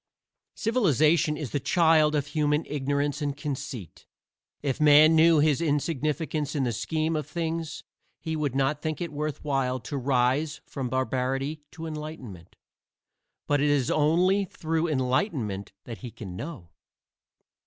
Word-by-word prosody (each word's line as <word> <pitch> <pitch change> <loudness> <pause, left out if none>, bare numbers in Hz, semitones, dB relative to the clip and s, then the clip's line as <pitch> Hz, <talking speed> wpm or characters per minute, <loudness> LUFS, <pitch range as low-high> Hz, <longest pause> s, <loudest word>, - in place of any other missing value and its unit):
Civilization 160 - +2
is 145 -7 -5
the 145 - 0
child 155 +1 +3
of 145 -2 0
human 150 0 0
ignorance 145 +1 -1
and 145 -1 -2
conceit. 140 - -6 0.6
If 140 0 -1
Man 150 +2 +7
knew 165 0 +6
his 150 0 +3
insignificance 150 -1 -1
in 140 - +1
the 125 - 0
scheme 155 +8 -1
of 150 -3 -3
things 165 -2 -3 0.4
he 160 -2 -3
would 145 -4 -2
not 140 +2 +1
think 155 -2 -3
it 170 -3 -4
worth 150 -1 -4
while 135 -3 0
to 145 - -5
rise 135 +3 +1
from 135 -3 -4
barbarity 130 +3 -1
to 160 +1 -7
enlightenment. 150 - -8 0.9
But 145 -1 +1
it 145 - +3
is 140 -3 +2
only 175 +6 +3
through 165 -2 -2
enlightenment 130 - -1
that 115 -4 -8
he 120 - -7
can 100 -5 -9
know. 130 - -7
150 Hz, 145 wpm, -27 LUFS, 135-160 Hz, 0.9 s, Man